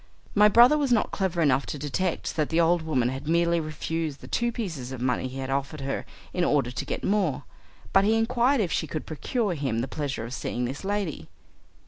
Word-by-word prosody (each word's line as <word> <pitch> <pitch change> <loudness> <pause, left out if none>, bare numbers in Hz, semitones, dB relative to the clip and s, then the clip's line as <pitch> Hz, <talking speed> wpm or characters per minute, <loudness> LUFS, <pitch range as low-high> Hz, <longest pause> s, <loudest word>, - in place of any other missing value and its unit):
My 210 0 +6
brother 245 +8 +7
was 280 -3 0
not 230 - +2
clever 180 -4 0
enough 140 -2 +2
to - - -4
detect 155 +5 -2
that 155 -2 0
the 165 - +1
old 170 +1 +4
woman 135 -7 +1
had 135 +3 -6
merely 170 +1 +3
refused 155 -1 -3
the - - -10
two 240 0 0
pieces 165 - -5
of 130 - -6
money 125 +1 0
he 130 +1 -8
had 135 0 -4
offered 140 +2 -2
her 135 0 -3 0.3
in 180 - 0
order 140 -7 +2
to 125 - -4
get - - -4
more, 195 -7 +1 0.5
but 195 - +6
he 220 +2 +3
inquired 240 +3 +2
if 180 -6 -1
she - - 0
could 155 - -4
procure 205 - -1
him 135 -7 -1
the 130 - -2
pleasure 135 -4 -3
of 120 - -7
seeing 125 -2 -2
this 130 +8 -5
lady. 195 - -3
160 Hz, 215 wpm, -26 LUFS, 135-200 Hz, 0.5 s, brother